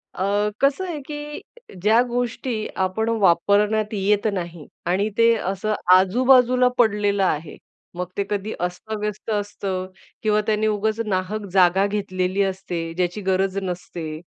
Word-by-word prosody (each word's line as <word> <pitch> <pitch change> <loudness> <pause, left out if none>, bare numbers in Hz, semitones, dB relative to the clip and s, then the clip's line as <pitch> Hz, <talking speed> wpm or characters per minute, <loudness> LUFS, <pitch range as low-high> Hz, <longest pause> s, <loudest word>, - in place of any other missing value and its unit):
अ, 205 +2 +1
कसं 280 +7 +2
आहे 315 -4 -4
की 295 0 -6 0.4
ज्या 220 +4 +5
गोष्टी 240 -2 -2 0.2
आपण 220 +5 -1
वापरण्यात 205 +4 +3
येत 205 +1 +1
नाही 170 -4 -5 0.2
आणि 195 +4 +1
ते 230 0 +5
असं 195 +1 -2 0.2
आजूबाजूला 250 +5 +4
पडलेलं 205 -3 +2
आहे. 155 -3 -1 0.4
मग 180 0 -2
ते 200 - +1
कधी 210 +1 -2
अस्त-व्यस्त 210 +4 -4
असतं 200 -2 -3 0.4
किंवा 210 0 +3
त्यानी 215 0 +1
उगाच 215 +1 0
नाहक 200 +2 -2
जागा 190 +1 +4
घेतलेली 190 -1 -1
असते. 180 -4 -3
ज्याची 180 +3 -2
गरज 190 0 0
नसते. 170 -3 -5
205 Hz, 130 wpm, -22 LUFS, 185-220 Hz, 0.4 s, ज्या